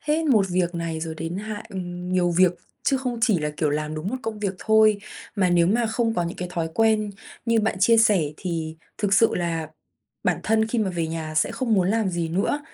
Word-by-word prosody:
hết 310 Hz, +2 st, 0 dB
một 215 Hz, -9 st, +4 dB
việc 175 Hz, -1 st, 0 dB
này 165 Hz, -1 st, -3 dB
rồi 160 Hz, 0 st, -4 dB
đến 165 Hz, +3 st, -4 dB
hạn 215 Hz, 0 st, -6 dB
ừm, 180 Hz, -2 st, -6 dB
nhiều 175 Hz, -1 st, +2 dB
việc 180 Hz, +1 st, +4 dB, 0.3 s
chứ 270 Hz, -, +2 dB
không 250 Hz, -2 st, -3 dB
chỉ 215 Hz, -8 st, +4 dB
là, 150 Hz, 0 st, -2 dB
kiểu, 150 Hz, -2 st, +1 dB
làm 150 Hz, +1 st, -2 dB
đúng 155 Hz, +4 st, -4 dB
một 255 Hz, -, -2 dB
công 220 Hz, -1 st, -4 dB
việc 200 Hz, -2 st, -2 dB
thôi. 220 Hz, -1 st, +4 dB, 0.4 s
Mà 185 Hz, -2 st, +2 dB
nếu 170 Hz, -1 st, +4 dB
mà 230 Hz, +5 st, +2 dB
không 225 Hz, 0 st, 0 dB
có 175 Hz, -, +1 dB
những 170 Hz, -, -5 dB
cái 180 Hz, -, -4 dB
thói 165 Hz, -3 st, -1 dB
quen 220 Hz, -2 st, +2 dB, 0.4 s
như 230 Hz, -1 st, +3 dB
bạn 215 Hz, -2 st, 0 dB
chia 230 Hz, +3 st, +5 dB
sẻ 210 Hz, -5 st, +4 dB
thì 160 Hz, -3 st, -4 dB, 0.2 s
thực 205 Hz, -2 st, +2 dB
sự 225 Hz, +3 st, +4 dB
là 165 Hz, -3 st, -2 dB, 0.6 s
bản -, -, +1 dB
thân 220 Hz, 0 st, +2 dB
khi 230 Hz, +1 st, -1 dB
mà 200 Hz, -3 st, +1 dB
về 170 Hz, -2 st, -2 dB
nhà 160 Hz, -1 st, -5 dB
sẽ 155 Hz, -, +2 dB
không 240 Hz, -4 st, 0 dB
muốn 185 Hz, -2 st, +2 dB
làm 220 Hz, -3 st, +1 dB
gì 170 Hz, -1 st, -2 dB
nữa, 195 Hz, -, 0 dB
190 Hz, 235 wpm, -24 LUFS, 170-220 Hz, 0.6 s, chia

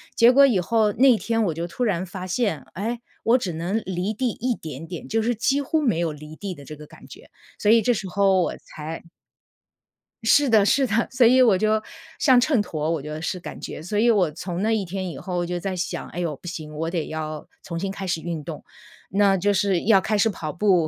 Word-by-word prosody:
结 235 Hz, +1 st, +7 dB
果 275 Hz, +2 st, +7 dB
以 235 Hz, -8 st, +2 dB
后 215 Hz, +2 st, +2 dB
那 250 Hz, +1 st, +5 dB
天 225 Hz, +1 st, 0 dB
我 175 Hz, -6 st, 0 dB
就 165 Hz, +2 st, -4 dB
突 245 Hz, -, -4 dB
然 190 Hz, -5 st, 0 dB
发 185 Hz, 0 st, -7 dB
现， 185 Hz, -, -1 dB
诶， 230 Hz, +5 st, -3 dB, 0.2 s
我 235 Hz, +3 st, +4 dB
只 190 Hz, -8 st, -3 dB
能 175 Hz, +7 st, -2 dB
离 185 Hz, +3 st, -2 dB
地 250 Hz, +3 st, -1 dB
一 240 Hz, +2 st, -2 dB
点 155 Hz, 0 st, -8 dB
点， 175 Hz, -1 st, -7 dB
就 225 Hz, +1 st, +1 dB
是 240 Hz, +2 st, 0 dB
几 270 Hz, +6 st, +1 dB
乎 310 Hz, +3 st, 0 dB
没 230 Hz, -, +1 dB
有 165 Hz, -2 st, -1 dB
离 150 Hz, +1 st, -11 dB
地 195 Hz, -3 st, -5 dB
的 140 Hz, -, -12 dB
这 150 Hz, +2 st, -9 dB
个 150 Hz, 0 st, -12 dB
感 -, -, -16 dB
觉， -, -, -14 dB, 0.3 s
所 210 Hz, -, +1 dB
以 230 Hz, +1 st, +6 dB
这 245 Hz, +3 st, +2 dB
时 205 Hz, -3 st, -4 dB
候 195 Hz, 0 st, +3 dB
我 -, -, -1 dB
才 155 Hz, +2 st, -8 dB, 1.2 s
是 280 Hz, +5 st, +4 dB
的 220 Hz, -3 st, +5 dB
是 270 Hz, +5 st, +3 dB
的， 230 Hz, 0 st, +1 dB
所 255 Hz, -1 st, +3 dB
以 255 Hz, +3 st, +6 dB
我 225 Hz, -7 st, +5 dB
就 215 Hz, +2 st, +1 dB, 0.4 s
像 260 Hz, -4 st, +5 dB
秤 255 Hz, -2 st, +2 dB
砣 170 Hz, -, -6 dB
我 160 Hz, -4 st, -1 dB
觉 150 Hz, -, -8 dB
得 155 Hz, +1 st, -5 dB
是 170 Hz, +3 st, -3 dB
感 175 Hz, -, -8 dB
觉， -, -, -7 dB
所 195 Hz, +6 st, -3 dB
以 235 Hz, +2 st, +4 dB
我 185 Hz, -8 st, +2 dB
从 175 Hz, +3 st, -5 dB
那 220 Hz, +2 st, +1 dB
一 215 Hz, -3 st, 0 dB
天 185 Hz, +1 st, -4 dB
以 155 Hz, -, -7 dB
后 180 Hz, +3 st, -3 dB
就 175 Hz, 0 st, -3 dB
在 190 Hz, +1 st, -3 dB
想， 180 Hz, +1 st, -4 dB
哎 -, -, -7 dB
呦， 165 Hz, -4 st, -2 dB
不 140 Hz, -, -20 dB
行， 155 Hz, -3 st, -6 dB
我 165 Hz, +2 st, -2 dB
得 170 Hz, -3 st, -2 dB
要 155 Hz, -1 st, -5 dB, 0.2 s
重 170 Hz, -2 st, -5 dB
新 195 Hz, +1 st, -2 dB
开 195 Hz, 0 st, -6 dB
始 170 Hz, -3 st, -1 dB
运 165 Hz, -3 st, -4 dB
动。 155 Hz, -1 st, -7 dB, 0.5 s
那 200 Hz, -1 st, +4 dB
就 195 Hz, +2 st, +1 dB
是 195 Hz, -3 st, +1 dB
要 215 Hz, -2 st, +6 dB
开 215 Hz, +3 st, 0 dB
始 220 Hz, +2 st, +3 dB
跑 155 Hz, -6 st, -5 dB
步， 180 Hz, -4 st, +3 dB
195 Hz, 260 characters per minute, -23 LUFS, 170-225 Hz, 1.2 s, 结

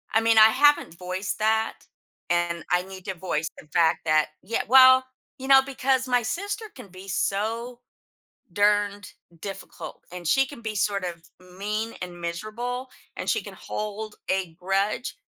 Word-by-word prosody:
I 225 Hz, -, +4 dB
mean, 225 Hz, 0 st, +3 dB
I 220 Hz, 0 st, +9 dB
haven't 290 Hz, -, +3 dB
voiced 185 Hz, +2 st, -4 dB
that, 220 Hz, +1 st, +2 dB, 0.6 s
and 175 Hz, -1 st, 0 dB
I 180 Hz, 0 st, +3 dB
need 190 Hz, 0 st, -11 dB
to 190 Hz, -, -3 dB
voice 165 Hz, -3 st, -2 dB
the -, -, -14 dB
fact 160 Hz, +1 st, +2 dB
that 155 Hz, -1 st, +3 dB
yea 225 Hz, +5 st, -2 dB
well, 260 Hz, +1 st, +8 dB, 0.4 s
you 265 Hz, -, -6 dB
know, 270 Hz, -1 st, +8 dB
because 265 Hz, -1 st, 0 dB
my 250 Hz, -1 st, +3 dB
sister 400 Hz, -, -3 dB
can 250 Hz, -6 st, -11 dB
be 185 Hz, +1 st, -12 dB
so 225 Hz, +6 st, -2 dB, 0.7 s
darned 205 Hz, 0 st, +1 dB, 0.3 s
difficult, 195 Hz, 0 st, -8 dB
and 180 Hz, -1 st, -7 dB
she 270 Hz, +11 st, +3 dB
can 275 Hz, -2 st, -11 dB
be 220 Hz, -1 st, -4 dB
sort 200 Hz, -1 st, 0 dB
of 170 Hz, -2 st, -5 dB, 0.4 s
mean 215 Hz, +3 st, -2 dB
and 175 Hz, -1 st, -7 dB
miserable, 225 Hz, +9 st, -4 dB, 0.3 s
and -, -, -5 dB
she -, -, +1 dB
can -, -, -10 dB
hold 215 Hz, 0 st, -5 dB
a 190 Hz, -3 st, -1 dB
grudge, 195 Hz, +5 st, -1 dB
205 Hz, 160 wpm, -25 LUFS, 180-240 Hz, 0.7 s, I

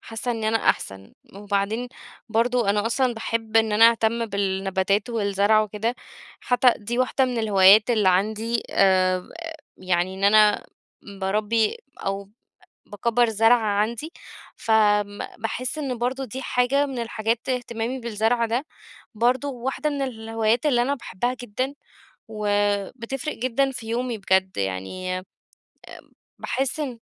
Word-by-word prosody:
حاسة 225 Hz, +2 st, -5 dB
إني 225 Hz, -2 st, -1 dB
أنا 225 Hz, +1 st, +2 dB
أحسن، 95 Hz, 0 st, -7 dB, 0.2 s
وبعدين 205 Hz, +4 st, -2 dB, 0.4 s
برضه 230 Hz, -1 st, +1 dB
أنا 205 Hz, +1 st, 0 dB
أصلًا 250 Hz, +1 st, +1 dB
باحب 225 Hz, 0 st, -2 dB
إن 220 Hz, -1 st, +3 dB
أنا 225 Hz, +2 st, +7 dB
أهتم 230 Hz, 0 st, 0 dB
بالنباتات 195 Hz, +1 st, -1 dB
والزرع 205 Hz, -1 st, +2 dB
وكده، 215 Hz, +3 st, -2 dB, 0.5 s
حتى 245 Hz, 0 st, +3 dB
دي 235 Hz, +3 st, -4 dB
واحدة 255 Hz, +1 st, +2 dB
من 250 Hz, -2 st, -2 dB
الهوايات 210 Hz, 0 st, +6 dB
اللي 215 Hz, -5 st, +3 dB
عندي، 215 Hz, +5 st, 0 dB
آآ 185 Hz, -1 st, +2 dB, 0.5 s
يعني 185 Hz, 0 st, -1 dB
إن 190 Hz, +1 st, -3 dB
أنا 210 Hz, 0 st, +5 dB, 0.5 s
باربّي 215 Hz, -, +1 dB, 0.2 s
أو 195 Hz, 0 st, -4 dB, 0.6 s
باكبّر 235 Hz, +3 st, +1 dB
زرع 225 Hz, +2 st, +4 dB
عندي، 220 Hz, +8 st, -1 dB, 0.4 s
ف -, -, -6 dB, 0.4 s
م 205 Hz, 0 st, -12 dB, 0.2 s
باحس 245 Hz, +6 st, -4 dB
إن 265 Hz, -5 st, -3 dB
برضه 255 Hz, +3 st, -2 dB
دي 260 Hz, +2 st, -7 dB
حاجة 260 Hz, +3 st, +1 dB
من 270 Hz, -3 st, -6 dB
الحاجات 230 Hz, +1 st, -2 dB
اهتمامي 245 Hz, 0 st, -2 dB
بالزرع 230 Hz, +1 st, 0 dB
ده، 235 Hz, +5 st, -1 dB, 0.5 s
برضه 245 Hz, +5 st, +1 dB
واحدة 265 Hz, +3 st, -3 dB
من 285 Hz, -1 st, -2 dB
الهوايات 225 Hz, 0 st, -1 dB
اللي 245 Hz, -5 st, +3 dB
أنا 275 Hz, +3 st, 0 dB
باحبها 245 Hz, -1 st, -3 dB
جدًا، 255 Hz, +4 st, -3 dB, 0.5 s
وبتفرق 210 Hz, +6 st, -2 dB
جدًا 255 Hz, +3 st, 0 dB
في 225 Hz, -3 st, -8 dB
يومي 240 Hz, 0 st, -2 dB
بجد 190 Hz, -1 st, +1 dB
يعني، 100 Hz, -, -3 dB
آمم 185 Hz, -, -10 dB, 1.2 s
باحس 265 Hz, +3 st, -2 dB
إن 260 Hz, -6 st, -4 dB
225 Hz, 135 wpm, -24 LUFS, 205-245 Hz, 1.2 s, أنا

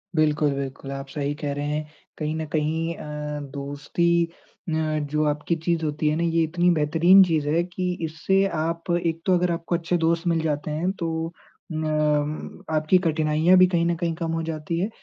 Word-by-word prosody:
बिल्कुल, 150 Hz, -1 st, +2 dB
बिल्कुल। 135 Hz, 0 st, -5 dB
आप 135 Hz, 0 st, -5 dB
सही 145 Hz, 0 st, -2 dB
कह 145 Hz, -2 st, -3 dB
रहे 145 Hz, +1 st, -3 dB
हैं। 150 Hz, +1 st, -2 dB, 0.3 s
कहीं 155 Hz, 0 st, -2 dB
न 160 Hz, 0 st, -3 dB
कहीं 160 Hz, +2 st, 0 dB
अ, 150 Hz, 0 st, -5 dB
दोस्ती 145 Hz, +5 st, 0 dB, 0.4 s
अ, 160 Hz, -, -1 dB, 0.3 s
जो 150 Hz, +1 st, -1 dB
आपकी 150 Hz, +3 st, -1 dB
चीज़ 165 Hz, 0 st, -1 dB
होती 150 Hz, 0 st, -1 dB
है 150 Hz, -, +1 dB
ना, 170 Hz, -, 0 dB
ये 165 Hz, -1 st, +2 dB
इतनी 175 Hz, +2 st, +2 dB
बेहतरीन 170 Hz, +5 st, +6 dB
चीज़ 160 Hz, -4 st, 0 dB
है 165 Hz, +3 st, +2 dB
कि 180 Hz, +1 st, -3 dB
इससे 190 Hz, +5 st, +1 dB
आप 165 Hz, +2 st, -2 dB
एक 165 Hz, 0 st, -1 dB
तो 185 Hz, -, +3 dB
अगर 175 Hz, 0 st, +1 dB
आपको 170 Hz, +1 st, -1 dB
अच्छे 170 Hz, +1 st, 0 dB
दोस्त 165 Hz, +1 st, +1 dB
मिल 165 Hz, -1 st, +2 dB
जाते 150 Hz, -1 st, -2 dB
हैं 165 Hz, +5 st, 0 dB
तो 170 Hz, -, -1 dB, 0.7 s
अ, -, -, -4 dB
उम, 150 Hz, -1 st, -1 dB
आपकी 155 Hz, +3 st, +3 dB
कठिनाइयाँ 155 Hz, +3 st, +3 dB
भी 185 Hz, 0 st, +7 dB
कहीं 170 Hz, -2 st, +1 dB
न 170 Hz, 0 st, +1 dB
कहीं 170 Hz, -1 st, -1 dB
कम 165 Hz, -1 st, -3 dB
हो 165 Hz, -, -1 dB
जाती 160 Hz, 0 st, -3 dB
है। 195 Hz, -, 0 dB
160 Hz, 195 wpm, -24 LUFS, 150-170 Hz, 0.7 s, भी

